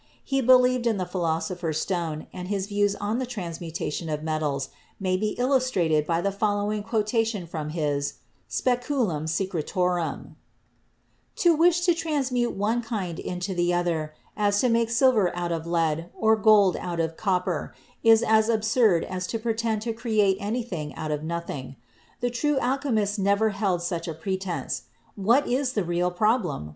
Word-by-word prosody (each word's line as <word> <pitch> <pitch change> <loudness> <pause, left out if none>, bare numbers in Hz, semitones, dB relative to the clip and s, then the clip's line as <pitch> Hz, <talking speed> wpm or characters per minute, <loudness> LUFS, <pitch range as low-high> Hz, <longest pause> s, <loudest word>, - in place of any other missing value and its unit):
He 270 -1 0
believed 250 -1 +5
in 225 -3 +1
the 185 - -1
Philosopher's 170 -2 -2
Stone 165 -4 -2
and 180 -1 -6
his 195 -1 -1
views 205 0 +1
on 210 +4 -2
the 260 - -1
transmutation 170 -6 -4
of 150 0 -3
metals 150 -4 -1 0.3
may 185 -2 0
be 210 +3 -1
illustrated 245 - +2
by 165 0 +1
the 200 - 0
following 205 +1 0
quotation 220 -2 0
from 155 -2 -5
his 145 -3 -1 0.3
"Speculum 245 - 0
Secretorum": 180 0 -2 1.0
"To 340 -2 +4
wish 345 +2 +4
to 350 -1 +4
transform 270 -9 -1
one 220 +4 +1
kind 195 -7 -4
into 180 +2 -4
the 175 0 +1
other, 160 -3 -1 0.2
as 205 -1 +2
to 250 - +3
make 230 0 +2
silver 230 -6 +3
out 175 -1 -2
of 165 0 -3
lead, 165 -1 0
or 220 0 +4
gold 210 -3 +5
out 175 -1 -4
of 165 0 -1
copper, 185 -2 -1 0.3
is 225 0 +6
as 220 0 +3
absurd 220 -5 +3
as 185 0 -4
to 225 - -2
pretend 225 -1 -1
to 230 -1 -2
create 215 -4 +1
anything 200 - -4
out 155 -1 -4
of 150 -1 -2
nothing. 160 -5 -5 0.5
The 245 0 0
true 295 +4 0
alchemists 245 -6 0
never 200 +3 +3
held 195 -4 -1
such 175 -1 -3
a 165 - -4
pretence. 190 +2 -3 0.3
What 230 +8 +3
is 255 +1 0
the 205 - 0
real 175 +1 0
problem? 180 - 0
200 Hz, 160 wpm, -26 LUFS, 170-230 Hz, 1.0 s, is